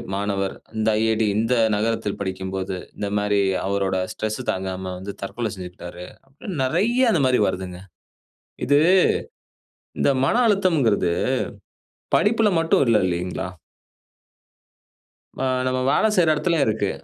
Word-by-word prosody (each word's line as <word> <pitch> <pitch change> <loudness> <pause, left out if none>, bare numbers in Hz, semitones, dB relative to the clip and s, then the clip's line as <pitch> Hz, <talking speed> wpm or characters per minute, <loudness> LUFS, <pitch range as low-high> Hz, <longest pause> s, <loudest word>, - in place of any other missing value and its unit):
மாணவர், 100 -1 -2 0.2
இந்த 110 0 +1
"IIT", 110 0 +1 0.2
இந்த 115 +3 +1 0.2
நகரத்தில் 110 -1 -1
படிக்கும்போது, 95 0 -3 0.2
இந்த 100 - -3
மாரி 105 0 +1 0.2
அவரோட 100 -1 0 0.2
ஸ்ட்ரெஸ் 110 0 -3
தாங்காம 95 0 -4
வந்து 100 +2 -7
தற்கொலை 110 +3 -3
செஞ்சுக்ட்டாரு" 90 -1 -9 0.2
அப்படின்னு 145 +4 -6
நறையா 240 - +2
இந்த 155 - +2
மாரி 125 -1 +3
வருதுங்க. 90 -1 -4 0.9
இது 145 +2 +5 1.2
இந்த - - +3
மன - - +1
அழுத்தம்ங்கறது 155 - +2 1.0
படிப்புல 220 0 +3
மட்டும் 165 -3 +3
இல்ல 115 -2 +4
இல்லைங்களா? 90 +1 -3 1.9
ஆ - - +1 0.2
நம்ம 130 0 0
வேல 220 - +3
செய்ற 165 -3 +4
இடத்திலயும் 160 -2 +1
இருக்கு. 105 -2 0
105 Hz, 115 wpm, -23 LUFS, 95-140 Hz, 1.9 s, இது